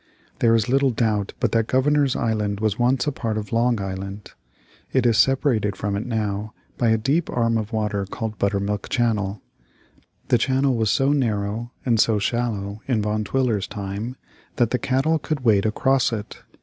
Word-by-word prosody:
There 115 -1 +4
is 115 0 +1
little 135 +2 +3
doubt 110 -4 0
but - - +1
that 115 -1 +1
Governor's 140 +1 +2
Island 105 -3 -1
was 110 0 -1
once 125 +1 +2
a 150 - 0
part 115 -5 -3
of 105 -1 -5
Long 120 0 +2
Island. 95 +1 -6 0.6
It 130 -2 +2
is 115 -2 +4
separated 125 -7 +2
from 100 +1 -2
it 105 +5 -3
now 110 -2 -2 0.2
by 120 - +3
a 110 - +4
deep 145 +9 0
arm 115 -1 +1
of 110 0 -2
water 105 -3 -1
called 110 +1 -5
Buttermilk 100 0 -1
Channel. 105 -5 0 0.9
The 120 - +4
channel 135 +2 +2
was 110 -2 +1
so 135 +7 +3
narrow 110 -3 -1
and 115 -4 +2
so 110 -1 +4
shallow 105 -2 -2
in 115 -6 +1
Van 105 +1 -1
Twiller's 115 -3 0
time 100 +5 -5 0.4
that 120 -2 +1
the 125 - +1
cattle 140 +5 +1
could 150 -1 -3
wade 110 -4 +3
across 130 +4 +2
it. 110 -2 -6
110 Hz, 175 wpm, -23 LUFS, 105-125 Hz, 0.9 s, There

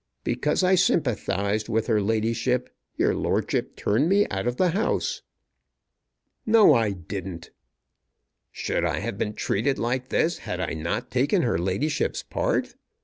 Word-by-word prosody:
Because 150 +9 0
I 185 +1 +4
sympathized 110 - +1
with 110 -1 +1
her 110 -3 +2
ladyship 115 +4 0 0.3
your - - +2
lordship - - -1
turned 125 +11 +1
me 205 +2 +4
out 95 +3 -2
of 120 0 -1
the 185 - +3
house." 200 +7 -1 1.2
"No; 220 -7 +6
I 115 -4 +2
didn't." 90 -2 -6 1.0
"Should - - -2
I - - 0
have 110 -3 -4
been 105 - -2
treated 130 +7 0
like 125 +2 -2
this 170 +2 +1
had 90 - -5
I 90 - -2
not 95 +11 -3
taken 140 +9 +2
her 115 -9 +1
ladyship's 95 - -1
part? - - -1
115 Hz, 145 wpm, -25 LUFS, 100-145 Hz, 1.2 s, No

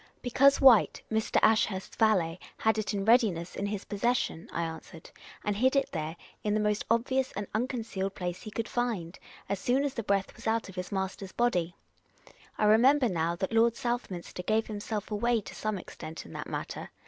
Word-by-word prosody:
" - - -38
Be 245 - -3
cause 275 +3 +5
White, 255 -6 +6
Mr. 220 0 +1
Ashurst's 215 -3 +2
valet, 185 -7 +2 0.2
had 220 0 +2
it 215 - -2
in 200 -2 -2
readiness 210 -8 +3
in 200 - -2
his 205 -1 -4
possession," 205 -5 -1
I 170 - -1
answered, 160 0 -8 0.2
" - - -18
and 205 -1 0
hid 260 +6 +2
it 275 - +1
there, 160 -1 -3 0.3
in 210 0 +1
the - - +2
most 210 0 +1
obvious 260 +3 +1
and 205 - -4
unconcealed 220 -5 -2
place 180 -1 -4
he - - -7
could 225 +2 -3
find, 215 -8 -2 0.3
as 200 - -2
soon 255 +7 +1
as 285 -2 -1
the 230 - -3
breath 200 -2 0
was - - -8
out 225 -2 0
of 190 - -11
his 180 -1 -5
master's 190 0 -3
body. 180 -8 +1 0.8
I 215 - +2
remember 250 +5 +5
now 170 -2 0
that 190 +4 -3
lyord 230 0 +4
Southminster 235 -8 -3
gave 220 +4 +1
himself 210 0 -5
away 235 +3 +2
to - - -10
some 215 -1 -2
extent 160 -2 -8
in - - -12
that - - -6
matter. - - -5
210 Hz, 200 wpm, -29 LUFS, 190-235 Hz, 0.8 s, White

